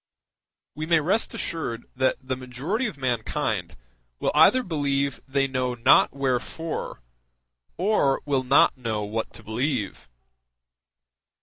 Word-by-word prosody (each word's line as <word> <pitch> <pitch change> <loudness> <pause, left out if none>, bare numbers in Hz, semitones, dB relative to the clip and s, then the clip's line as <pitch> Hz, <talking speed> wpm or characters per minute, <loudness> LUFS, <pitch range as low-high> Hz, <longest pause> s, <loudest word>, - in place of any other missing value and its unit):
We 155 +2 -5
may 165 -1 +4
rest 190 +9 0
assured 120 -8 -3
that 130 +1 +2
the 130 0 -3
majority 135 - -3
of 205 - -7
mankind 125 -5 -2 0.4
will - - 0
either 160 +12 +6
believe 140 - -1
they 135 0 +1
know 130 -2 -1
not 120 +2 +5
wherefore, 140 - -3 0.8
or 180 -8 +2
will 140 -3 +1
not 130 +2 +4
know 115 -5 -3
what 110 +2 -3
to 115 - -13
believe. 110 - -3
135 Hz, 120 wpm, -25 LUFS, 125-155 Hz, 0.8 s, either